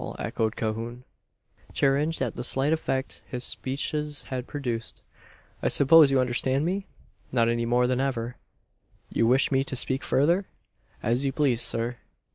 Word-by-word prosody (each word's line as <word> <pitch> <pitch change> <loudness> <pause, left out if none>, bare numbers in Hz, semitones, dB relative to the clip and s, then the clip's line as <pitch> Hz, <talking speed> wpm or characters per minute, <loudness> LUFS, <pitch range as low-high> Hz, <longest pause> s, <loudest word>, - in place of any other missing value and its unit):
echoed 110 0 -2
Calhoun, 115 +2 -4 0.7
chagrined 145 +4 +1
at - - -3
the - - -4
slight 135 +5 +4
effect 135 -4 -3
his 125 -1 -5
speeches 150 +3 -2
had 130 -1 -5
produced; 120 -6 -4 0.6
"I - - 0
suppose 150 +1 +6
you 135 -1 +3
understand 130 +3 +1
me?" 195 +3 -2 0.4
"Not 115 -2 +2
any 115 0 0
more 120 +1 +3
than 125 0 0
ever." 125 -3 -2 0.7
"You 115 - +2
wish 130 +4 +3
me 135 0 +2
to 135 - -5
speak 130 +1 0
further?" 170 +8 +2 0.6
"As 120 +5 +1
you 135 - 0
please, 135 -5 +1
sir." 120 +1 0
130 Hz, 150 wpm, -26 LUFS, 120-140 Hz, 0.7 s, suppose